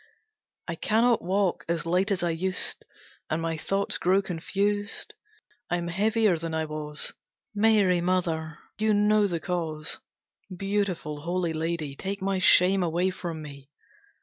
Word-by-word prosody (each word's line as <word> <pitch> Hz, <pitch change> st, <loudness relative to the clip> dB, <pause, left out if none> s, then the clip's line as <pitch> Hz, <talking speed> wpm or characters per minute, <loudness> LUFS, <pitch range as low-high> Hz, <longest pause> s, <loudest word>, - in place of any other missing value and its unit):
I 170 Hz, -, -2 dB
cannot 225 Hz, +7 st, +2 dB
walk 190 Hz, 0 st, 0 dB
as 170 Hz, -1 st, -1 dB
light 180 Hz, +4 st, +2 dB
as 190 Hz, -3 st, 0 dB
I 170 Hz, -, +1 dB
used, 185 Hz, +3 st, -2 dB, 0.4 s
and 155 Hz, -, 0 dB
my 165 Hz, 0 st, -1 dB
thoughts 195 Hz, +5 st, 0 dB
grow 185 Hz, +2 st, +3 dB
confused. 200 Hz, +4 st, -2 dB, 0.6 s
I 175 Hz, -, +1 dB
am 170 Hz, 0 st, -3 dB
heavier 210 Hz, 0 st, +2 dB
than 165 Hz, 0 st, -3 dB
I 160 Hz, 0 st, 0 dB
was. 150 Hz, -1 st, -4 dB, 0.4 s
Mary 205 Hz, -4 st, +4 dB
Mother, 165 Hz, -3 st, -1 dB, 0.2 s
you 215 Hz, 0 st, +3 dB
know 210 Hz, 0 st, +4 dB
the 170 Hz, -3 st, -2 dB
cause! 160 Hz, -3 st, -3 dB, 0.6 s
Beautiful 195 Hz, -6 st, -2 dB
Holy 175 Hz, 0 st, -1 dB
Lady, 160 Hz, -3 st, -2 dB
take 195 Hz, +6 st, -4 dB
my 195 Hz, 0 st, 0 dB
shame 185 Hz, +1 st, +5 dB
away 175 Hz, +2 st, +1 dB
from 170 Hz, -4 st, -5 dB
me! 140 Hz, -2 st, -11 dB
180 Hz, 145 wpm, -27 LUFS, 165-200 Hz, 0.6 s, shame